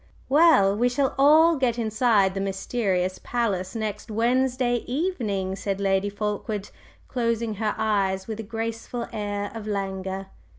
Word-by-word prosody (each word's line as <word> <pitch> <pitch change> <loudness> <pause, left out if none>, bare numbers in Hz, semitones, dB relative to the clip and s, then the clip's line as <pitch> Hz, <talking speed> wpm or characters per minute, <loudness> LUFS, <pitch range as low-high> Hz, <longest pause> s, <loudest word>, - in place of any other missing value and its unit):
"Well, 275 -10 +5
we 245 +3 +2
shall 265 +2 0
all 315 +4 +6
get 245 -3 +1
inside 220 -3 +2
the 195 - -3
mysterious 195 -1 -1
palace 200 -6 -1
next 215 0 -4
Wednesday 245 +2 +1
evening," 230 - -1
said 195 0 -3
Lady 195 0 +1
Fulkeward, 210 0 -3 0.4
closing 230 -2 -1
her 215 -1 0
eyes 195 -3 0
with 220 -1 -6
a - - -1
graceful 225 +2 -4
air 205 -1 -3
of 220 -2 -7
languor. 195 -1 -3
215 Hz, 135 wpm, -25 LUFS, 195-240 Hz, 0.4 s, all